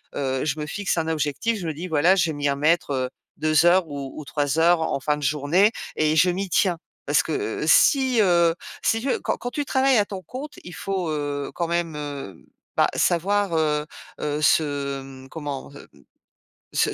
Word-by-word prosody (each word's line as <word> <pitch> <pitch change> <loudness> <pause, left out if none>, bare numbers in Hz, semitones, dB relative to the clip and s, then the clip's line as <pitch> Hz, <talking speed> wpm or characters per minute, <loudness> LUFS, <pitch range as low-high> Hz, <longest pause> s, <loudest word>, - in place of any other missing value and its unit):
Heu, 135 -1 -1
je 155 0 -1
me 150 - -3
fixe 195 +4 -2
un 160 -1 0
objectif, 160 +9 -1
je 175 - -5
me 160 - -2
dis: 165 +5 -6
«Voilà, 160 +4 +4
je 175 -3 +2
vais - - -2
m'y 145 -1 -1
remettre, 150 +3 +1
heu, 130 -1 -1 0.3
2 155 +1 +3
heures 180 +1 +5
ou 140 -2 -6
ou 155 - -6
3 145 +1 -1
heures 170 +1 +5
en 160 - -1
fin 150 +2 0
de 150 - -7
journée» 150 +9 +3 0.3
et 155 0 +2
je 170 +4 +5
m'y 190 +3 -2
tiens. 180 0 +2 0.3
Parce - - +3
que, - - -4 0.3
heu, - - -1
si, 265 -4 +5
heu, 170 -4 +4 0.3
si 225 0 +1
tu 270 - -2
veux - - +1
quand - - -1
quand 245 - -5
tu 290 +3 -2
travailles 265 -1 +3
à 205 - +3
ton 195 -2 -7
compte, 285 +7 -7
il 180 - -9
faut, 185 -1 -3
heu, 145 -2 -3
quand 170 - -2
même, 170 -2 -1
heu, 140 - -6 0.4
bah, - - +5
savoir, 195 +1 +1
heu 150 -1 +1 0.4
heu, 150 0 -2
se, 140 -3 +1
mmh, 135 0 -12
comment? 145 -3 -6
Hem, - - -12 0.9
se - - +1
160 Hz, 210 wpm, -24 LUFS, 145-185 Hz, 0.9 s, heures